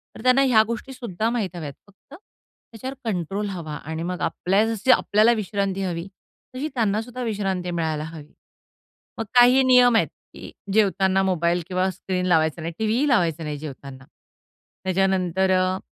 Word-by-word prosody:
तर - - -10
त्यांना 255 +2 +5
ह्या 235 -5 +5
गोष्टी 235 +3 -5
सुद्धा 225 -4 -3
माहित 215 -7 -2
हव्यात 150 -5 -6
फक्त 200 +7 -21 0.6
त्याच्यावर 260 +4 -7
कंट्रोल 195 +2 -2
हवा 165 -6 -6
आणि 160 +2 -6
मग 180 +1 -4
आपल्या 195 +4 +1
जशी 225 +3 +1
आपल्याला 215 -1 +4
विश्रांती 200 -2 -2
हवी, 175 -1 -3 0.5
तशी 275 +4 -2
त्यांना 215 -4 +1
सुद्धा 245 +2 -8
विश्रांती 195 -5 -2
मिळायला 160 -3 -2
हवी. 155 -2 -10 0.9
मग 225 - -2
काही 250 +2 +7
नियम 250 -2 +5
आहेत, - - +2 0.2
की - - -10 0.2
जेवतांना 190 -2 +2
मोबाईल 175 -2 +1
किंवा 185 0 0
स्क्रीन 185 0 -3
लावायचा 160 -2 +2
नाही, 165 - -4
टी-व्हीही 225 +7 +1
लावायचा 170 - +1
नाही, 150 -1 -4
जेवतांना. 140 -2 -9 0.8
त्याच्यानंतर 190 0 +1
अ, 185 0 +2
190 Hz, 155 wpm, -23 LUFS, 170-225 Hz, 0.9 s, काही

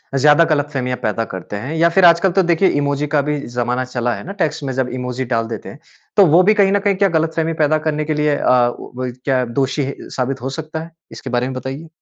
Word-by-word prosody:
ज़्यादा 150 +4 +5
गलतफ़हमियाँ 135 -4 -2
पैदा 115 +2 0
करते 95 +2 -6
हैं 130 +10 -5
या 170 +1 +4
फिर 185 +1 +4
आजकल 170 +2 +5
तो 190 +1 +2
देखिए, 170 +2 +3
इमोजी 145 0 0
का 145 0 +2
भी 150 0 -2 0.2
ज़माना 125 +1 0
चला 120 -1 -2
है - - -8
ना 195 - -6
टेक्स्ट 150 -1 -2
में, 135 -2 -3
जब 130 -1 -1
इमोजी 125 +1 -3
डाल 115 -2 -1
देते 115 - -7
हैं। 145 - -12 0.4
तो 200 - +8
वो 165 +2 +5
भी 215 +3 +5
कहीं 200 -2 +3
न 200 - +3
कहीं 200 -1 +1
क्या 195 0 +2
गलतफ़हमी 160 0 0
पैदा 155 +1 +3
करने 150 0 -1
के 155 - -1
लिए 150 -1 +1
अ, 125 -1 +3
वो - - -10
वही 125 0 -3
क्या 130 +1 -1 0.2
दोषी 135 +2 0
ही 140 - -4 0.2
साबित 130 0 -2
हो 130 - -3
सकता 160 +1 -5
है? 165 - -12 0.2
इसके 130 - -8
बारे 120 0 0
में 130 - -4
बताइए। 135 +5 -6
145 Hz, 250 wpm, -18 LUFS, 125-165 Hz, 0.4 s, तो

